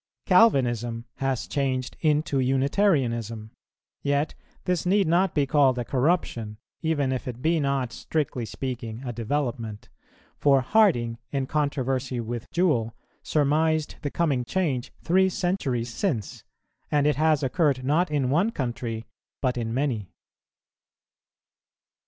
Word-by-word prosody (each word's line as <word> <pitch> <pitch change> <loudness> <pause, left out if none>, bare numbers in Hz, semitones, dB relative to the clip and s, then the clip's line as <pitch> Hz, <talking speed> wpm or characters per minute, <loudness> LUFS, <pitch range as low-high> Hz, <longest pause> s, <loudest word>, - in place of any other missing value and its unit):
Calvinism 120 - +3
has 135 -4 -1
changed 130 -3 -2
into 150 -3 +2
Unitarianism: 130 - +1 0.5
yet 145 +1 0 0.3
this 180 -2 0
need 195 +2 +3
not 175 +2 +2
be 145 -2 +3
called 135 -2 +3
a 120 - -2
corruption, 125 -6 0 0.2
even 145 -5 0
if 130 -1 -3
it 125 -1 -5
be 160 +4 +2
not, 140 -4 -1
strictly 145 -6 -2
speaking, 120 0 -5
a 120 - -3
development; 115 -3 -3 0.5
for 140 -2 +4
Harding, 125 - +3
in 135 -2 -1
controversy 135 -3 -1
with 120 +1 -5
Jewell, 125 -11 +1 0.3
surmised 155 +1 +1
the 145 - -2
coming 140 -6 0
change 140 -4 -1
three 190 +2 +4
centuries 135 -11 -1
since, 125 - -2 0.5
and 145 -1 +2
it 150 -3 +2
has 155 -2 +3
occurred 135 -1 +1
not 160 +6 +2
in 140 -4 0
one 175 +9 +3
country, 120 - -4 0.3
but 130 -2 0
in 115 -2 -2
many. 120 -6 -1
135 Hz, 125 wpm, -26 LUFS, 120-155 Hz, 0.5 s, for